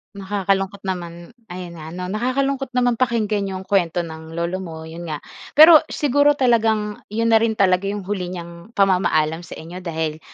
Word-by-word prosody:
Nakakalungkot 195 0 -1
naman, 175 -1 -5 0.2
ayon 180 0 -7
nga 155 - -8
'no? 180 0 -5
Nakakalungkot 255 +3 -1
naman 245 -2 +2
pakinggan 215 -5 0
'yong 190 -1 -5
kuwento 175 -3 +1
ng 160 0 -9
lolo 170 +2 -2
mo, 160 -3 -7
'yon 165 +2 -8
nga. 150 -2 -5 0.3
Pero 315 +1 +10
siguro 290 0 +2
talagang 220 -5 +1
'yon 230 +2 0
na 225 - +6
rin 225 0 +1
talaga 190 -1 +2
'yong 205 -1 -3
huli 190 -2 -3
niyang 170 +4 -9
pamamaalam 175 -5 +2
sa 175 - -10
inyo, 170 +3 -9
dahil 160 -3 -3
190 Hz, 170 wpm, -21 LUFS, 170-225 Hz, 0.3 s, Pero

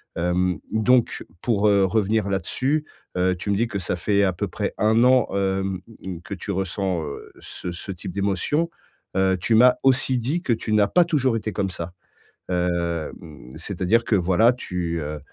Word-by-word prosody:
Hem, 90 +1 +1
donc 120 +3 +2 0.2
pour, 105 -3 +2
heu, 100 -1 +4
revenir 105 +1 +1
là 95 -1 0
dessus, 140 - -1 0.3
heu, 90 0 +2
tu 100 +3 -3
me - - +2
dis 115 +3 +1
que 100 - -4
ça 90 - -2
fait 100 +3 +1
à 95 -2 +2
peu - - -3
près - - -3
1 110 +2 +4
an, 125 -2 +5
hem, 95 -1 -1 0.2
mmh 95 -2 -5
mh, - - -11
que - - -6
tu 100 - -8
ressens, 95 -2 -1
heu, 70 - -8
ce 90 - -7
ce 90 +3 -7
type 90 -1 -7
d'émotions. 100 - 0 0.5
Heu, 95 -1 +3
tu 115 - 0
m'as 125 +2 +7
aussi 130 -1 +3
dit 140 +9 -1
que 125 - +1
tu 110 -1 -3
n'as 105 -1 +4
pas 175 - +4
toujours 135 -8 +1
été 110 0 -3
comme 100 -2 -1
ça. 85 0 -6 0.6
Hem, 85 -6 -3
c'est-à-dire 115 +6 0
que 110 - +2
voilà, 95 +6 +4
tu, 90 -8 -3
heu, 75 +1 -5
100 Hz, 190 wpm, -23 LUFS, 90-115 Hz, 0.6 s, m'as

